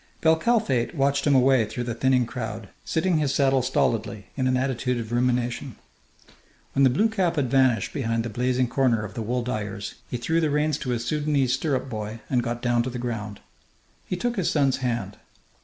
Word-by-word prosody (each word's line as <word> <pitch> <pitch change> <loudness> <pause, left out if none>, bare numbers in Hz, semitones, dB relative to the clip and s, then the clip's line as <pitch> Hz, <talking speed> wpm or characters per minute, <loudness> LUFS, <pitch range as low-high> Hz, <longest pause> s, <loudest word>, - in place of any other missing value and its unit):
Bel 160 0 +5
Kalfate 160 - +1
watched 140 0 +1
him 140 - +4
away 130 -2 +5
through 115 +3 -4
the 120 -1 -3
thinning 125 +1 +2
crowd, 110 -4 -6
sitting 165 0 +1
his 145 -2 0
saddle 135 -1 +3
stolidly, 110 -4 -1
in 130 -2 0
an 130 0 +2
attitude 125 -1 -1
of 115 -1 -6
rumination. 125 +1 0 1.0
When 140 - +2
the 130 - +7
blue 180 - +3
cap 190 -6 0
had 135 -5 0
vanished 130 -4 +3
behind 115 -3 -1
the 120 - -4
blazing 125 +2 +1
corner 120 -4 +1
of 105 - -8
the 115 - -4
wool 120 +3 -1
dyers, 105 -4 -4 0.2
he 125 - -2
threw 160 +8 0
the 155 - +1
reins 150 0 +1
to 130 - -5
his 120 -1 -1
Sudanese 145 -2 +1
stirrup 135 -1 -1
boy 110 -2 -5
and 125 -2 +3
got 120 0 -4
down 120 -1 +2
to 125 - -2
the 125 - -5
ground. 110 -4 -5 0.7
He - - -2
took 240 +6 -2
his 185 - +1
son's 140 -3 +2
hand. 115 -6 -3
125 Hz, 200 wpm, -25 LUFS, 115-140 Hz, 1.0 s, the